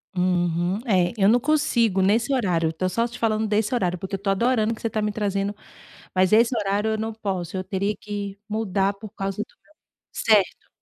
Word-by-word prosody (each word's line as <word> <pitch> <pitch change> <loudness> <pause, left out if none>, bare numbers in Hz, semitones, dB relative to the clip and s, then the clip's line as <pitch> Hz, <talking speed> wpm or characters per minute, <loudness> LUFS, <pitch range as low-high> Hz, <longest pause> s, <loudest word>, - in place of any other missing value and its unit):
Uhum. 180 +1 +1
É, 185 -4 +2
eu 195 0 +4
não 240 - +5
consigo 235 -9 +2
nesse 220 +7 +2
horário. 180 -10 +1
Eu 160 - -5
tô 185 +3 -1
só 230 +6 0
te 240 +1 -10
falando 220 -1 0
desse 210 +3 0
horário 180 -7 0
porque 190 +2 -4
eu - - -5
tô 195 0 -2
adorando 225 +2 +2
que - - -15
você 230 - -1
tá 215 0 -2
me 210 - 0
trazendo 200 -1 -1 0.6
mas 185 +1 +3
esse 230 +3 +4
horário, 205 +1 0
eu 220 - -1
não 220 0 -3
posso. 190 -4 -4
Eu 185 - -3
teria 200 +2 -1
que 205 -1 -5
mudar 200 -2 0
por 210 +2 -10
causa 195 -2 -4
do - - -10
meu - - -27 0.4
certo. 210 -4 +2
205 Hz, 210 wpm, -24 LUFS, 190-220 Hz, 0.6 s, não